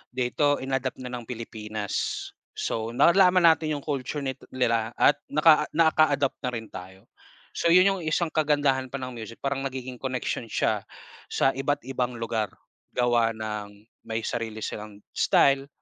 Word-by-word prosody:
dito 135 Hz, +3 st, +2 dB
in-adapt 130 Hz, -1 st, -2 dB
na 125 Hz, -, -6 dB
ng 120 Hz, -2 st, -6 dB
Pilipinas. 110 Hz, -3 st, -6 dB, 0.6 s
So, 115 Hz, +1 st, -3 dB
nalaman 180 Hz, +4 st, +5 dB
natin 160 Hz, -2 st, +4 dB
yung 145 Hz, -, -6 dB
culture 140 Hz, 0 st, -3 dB
ni 135 Hz, -, -1 dB, 0.2 s
nila 115 Hz, -3 st, +1 dB
at 145 Hz, 0 st, +4 dB
nakaa 150 Hz, 0 st, +5 dB
nakaadapt 155 Hz, -4 st, +3 dB
na 125 Hz, -, -3 dB
rin 115 Hz, -2 st, -5 dB
tayo. 95 Hz, +1 st, -11 dB, 0.4 s
So, -, -, -1 dB
yun 180 Hz, +3 st, +6 dB
yung -, -, -7 dB
isang 155 Hz, +1 st, 0 dB
kagandahan 145 Hz, -4 st, +1 dB
pa 130 Hz, -, -8 dB
ng 130 Hz, 0 st, -5 dB
music 115 Hz, -1 st, -9 dB
parang 140 Hz, 0 st, 0 dB
nagiging 130 Hz, -2 st, -5 dB
connection 130 Hz, -2 st, -3 dB
siya, -, -, -1 dB, 0.4 s
sa 135 Hz, -, +2 dB
iba't 140 Hz, +2 st, -1 dB
ibang 125 Hz, -1 st, -2 dB
lugar, 115 Hz, -2 st, -2 dB, 0.5 s
gawa 120 Hz, -2 st, +2 dB
ng 105 Hz, -2 st, -6 dB, 0.2 s
may 110 Hz, 0 st, -2 dB
sarili 110 Hz, -2 st, -4 dB
silang 105 Hz, -1 st, -7 dB
style 140 Hz, 0 st, +3 dB
130 Hz, 150 wpm, -26 LUFS, 115-145 Hz, 0.6 s, yun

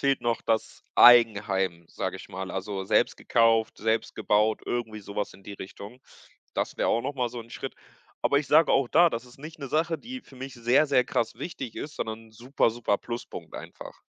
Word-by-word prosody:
fehlt 140 Hz, 0 st, +2 dB
noch 120 Hz, -1 st, 0 dB
das 110 Hz, -1 st, -2 dB
Eigenheim, 100 Hz, -7 st, +5 dB
sage -, -, -4 dB
ich -, -, -12 dB
mal. 95 Hz, 0 st, -6 dB
Also, 95 Hz, 0 st, -4 dB
selbst -, -, +2 dB
gekauft, 115 Hz, -1 st, +2 dB
selbst 110 Hz, +1 st, 0 dB
gebaut, 105 Hz, 0 st, +2 dB
irgendwie 115 Hz, -3 st, -3 dB
so 100 Hz, 0 st, -11 dB
was 105 Hz, -, -2 dB
in 95 Hz, -, -16 dB
die 100 Hz, -, -8 dB
Richtung. 100 Hz, +6 st, -10 dB, 0.5 s
Das -, -, -2 dB
wäre -, -, +1 dB
auch 115 Hz, -, +2 dB
noch 140 Hz, +2 st, -3 dB
mal 125 Hz, -2 st, 0 dB
so 120 Hz, 0 st, -7 dB
'n 115 Hz, -, -13 dB
Schritt. -, -, -6 dB, 0.5 s
Aber 140 Hz, -, +3 dB
ich 145 Hz, -, -3 dB
sage 160 Hz, +1 st, +5 dB
auch 135 Hz, -, +3 dB
da, 170 Hz, +4 st, +5 dB
das 115 Hz, +2 st, -4 dB
ist 125 Hz, +1 st, -17 dB
nicht 155 Hz, +3 st, -10 dB
'ne 140 Hz, -, -6 dB
Sache, 160 Hz, +2 st, 0 dB
die 255 Hz, +2 st, -8 dB
für 135 Hz, -, -18 dB
mich 135 Hz, +1 st, -7 dB
sehr, 120 Hz, +6 st, +3 dB
sehr 130 Hz, -3 st, +3 dB
krass 115 Hz, -1 st, -1 dB
wichtig 135 Hz, -9 st, -6 dB
ist, 150 Hz, 0 st, -6 dB
sondern 110 Hz, 0 st, -5 dB
super, 120 Hz, +2 st, 0 dB
super 110 Hz, -3 st, 0 dB
Pluspunkt 120 Hz, 0 st, -7 dB
einfach. -, -, -10 dB
115 Hz, 210 wpm, -27 LUFS, 105-135 Hz, 0.5 s, Eigenheim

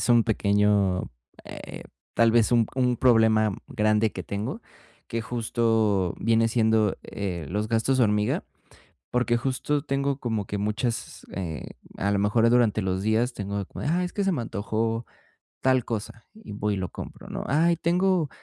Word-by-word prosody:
es -, -, -1 dB
un 120 Hz, -1 st, +5 dB
pequeño, 100 Hz, -3 st, +2 dB, 0.3 s
eh, -, -, -9 dB, 0.3 s
tal 115 Hz, -1 st, +4 dB
vez 120 Hz, 0 st, +3 dB
un 115 Hz, -2 st, +4 dB
un 125 Hz, -2 st, +1 dB
problema 110 Hz, -4 st, +4 dB
grande 110 Hz, -1 st, +1 dB
que -, -, -5 dB
tengo, 100 Hz, +2 st, -4 dB, 0.5 s
que 115 Hz, 0 st, -3 dB
justo 110 Hz, -5 st, +1 dB
viene 115 Hz, 0 st, +3 dB
siendo, 110 Hz, -3 st, +2 dB
eh, 90 Hz, -6 st, -5 dB
los 105 Hz, +4 st, -1 dB
gastos 115 Hz, +4 st, +1 dB
hormiga, 105 Hz, -3 st, +2 dB, 0.7 s
porque 125 Hz, -1 st, +1 dB
justo 135 Hz, +3 st, -1 dB
tengo 140 Hz, -1 st, -1 dB
como 110 Hz, -5 st, -2 dB
que 100 Hz, -, -4 dB
muchas, 105 Hz, +3 st, -3 dB
eh, 80 Hz, -7 st, -5 dB, 0.3 s
a 100 Hz, +1 st, 0 dB
lo 100 Hz, -, +1 dB
mejor, 110 Hz, +3 st, +3 dB
durante 115 Hz, -3 st, +3 dB
los 95 Hz, 0 st, -1 dB
días 110 Hz, +4 st, +1 dB
tengo 100 Hz, 0 st, -4 dB
de 100 Hz, -, -4 dB
como -, -, -8 dB
de, -, -, -1 dB
ay, 180 Hz, +1 st, +1 dB
es 180 Hz, -, -5 dB
que 200 Hz, -, -1 dB
se 195 Hz, -, +2 dB
me 125 Hz, -, -1 dB
antojó 115 Hz, +1 st, -2 dB, 0.6 s
tal 130 Hz, -2 st, +2 dB
cosa 110 Hz, 0 st, -5 dB
y 220 Hz, -, -13 dB
voy 105 Hz, 0 st, -1 dB
y -, -, -4 dB
lo 95 Hz, -2 st, -3 dB
compro, -, -, -9 dB
¿no? -, -, -5 dB
Ay, 165 Hz, +5 st, +3 dB
tengo 175 Hz, -1 st, +1 dB
115 Hz, 175 wpm, -26 LUFS, 105-125 Hz, 0.7 s, un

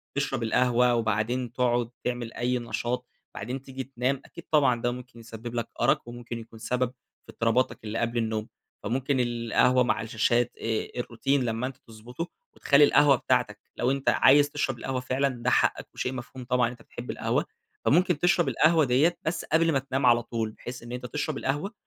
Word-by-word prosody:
تشرب 135 Hz, -3 st, -1 dB
القهوة، 125 Hz, +1 st, +3 dB
وبعدين 115 Hz, +2 st, 0 dB
تاقعُد 120 Hz, -2 st, +1 dB
تعمل 120 Hz, -2 st, -3 dB
أي 125 Hz, +1 st, 0 dB
نشاط 120 Hz, +1 st, -3 dB, 0.3 s
وبعدين 125 Hz, +5 st, -5 dB
تيجي 135 Hz, -1 st, -6 dB
تنام، 130 Hz, +1 st, -2 dB
أكيد 170 Hz, -, -12 dB
طبعًا 135 Hz, -6 st, +3 dB
ده 120 Hz, -, +1 dB
ممكن 125 Hz, -1 st, -9 dB
يسبب 115 Hz, +1 st, -8 dB
لك 115 Hz, -1 st, -2 dB
أرَق -, -, +3 dB
وممكن 120 Hz, -1 st, -7 dB
يكون 115 Hz, 0 st, -12 dB
سبب 125 Hz, +2 st, 0 dB, 0.4 s
في -, -, -11 dB
اضطراباتك 115 Hz, 0 st, +1 dB
اللي 110 Hz, +1 st, -3 dB
قبل 115 Hz, +1 st, -1 dB
النوم. 110 Hz, -2 st, -1 dB, 0.4 s
فممكن 130 Hz, +2 st, 0 dB
القهوة 120 Hz, +1 st, +2 dB
مع 125 Hz, -, 0 dB
الشاشات، 115 Hz, +2 st, +1 dB
آآ، 110 Hz, -1 st, -2 dB
الروتين 130 Hz, +3 st, 0 dB
لمّا 115 Hz, +2 st, -1 dB
أنت 130 Hz, -1 st, -8 dB
تضبطه 120 Hz, +9 st, -7 dB, 0.3 s
وتخلّي 140 Hz, +1 st, +4 dB
القهوة 145 Hz, -1 st, +6 dB
بتاعتك، 125 Hz, -4 st, 0 dB, 0.2 s
لو 125 Hz, -, +1 dB
أنت 135 Hz, 0 st, 0 dB
عايز 145 Hz, +2 st, +5 dB
تشرب 135 Hz, -3 st, -2 dB
القهوة 130 Hz, 0 st, -2 dB
فعلًا 130 Hz, +2 st, 0 dB
ده 125 Hz, -, +2 dB
حقك -, -, +2 dB
وشيء 125 Hz, -, -3 dB
مفهوم 125 Hz, 0 st, -8 dB
طبعًا 125 Hz, 0 st, +2 dB
إن -, -, -4 dB
أنت 125 Hz, -, -13 dB
بتحب -, -, -7 dB
القهوة. -, -, 0 dB, 0.4 s
فممكن 175 Hz, +2 st, +3 dB
تشرب 175 Hz, 0 st, +3 dB
القهوة 160 Hz, -1 st, +4 dB
ديّة 140 Hz, +8 st, +3 dB
بس 165 Hz, +1 st, -2 dB
قبل 165 Hz, +1 st, +3 dB
ما 140 Hz, -, +2 dB
تنام 135 Hz, 0 st, -2 dB
على 120 Hz, -1 st, +5 dB
طول، 115 Hz, -2 st, -3 dB
بحيث 120 Hz, +3 st, -9 dB
إن 120 Hz, -, -9 dB
أنت 125 Hz, 0 st, -5 dB
تشرب 150 Hz, +2 st, -3 dB
القهوة 145 Hz, +9 st, -2 dB
125 Hz, 185 wpm, -27 LUFS, 115-135 Hz, 0.4 s, القهوة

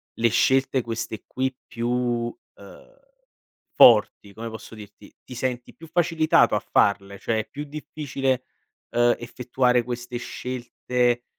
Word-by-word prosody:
le 115 Hz, 0 st, +2 dB
scelte 130 Hz, +3 st, +2 dB
queste 115 Hz, -1 st, -5 dB
qui 130 Hz, 0 st, -2 dB
più, 120 Hz, 0 st, -1 dB, 0.2 s
ehm, -, -, -16 dB, 0.8 s
forti, 100 Hz, -1 st, +6 dB
come 115 Hz, +2 st, -6 dB
posso 110 Hz, 0 st, -10 dB
dirti, 105 Hz, -2 st, -14 dB
ti -, -, -10 dB
senti 125 Hz, -1 st, -3 dB
più 165 Hz, -, -13 dB
facilitato 165 Hz, -1 st, +3 dB
a -, -, +2 dB
farle, 100 Hz, -1 st, +1 dB
cioè 110 Hz, +1 st, -1 dB
è 110 Hz, -, -4 dB
più 145 Hz, +1 st, -6 dB
difficile, 140 Hz, -3 st, -3 dB, 0.5 s
ehm, 120 Hz, 0 st, +3 dB
effettuare 125 Hz, 0 st, 0 dB
queste 120 Hz, 0 st, -5 dB
scelte, 120 Hz, 0 st, -2 dB
120 Hz, 125 wpm, -24 LUFS, 115-130 Hz, 0.8 s, forti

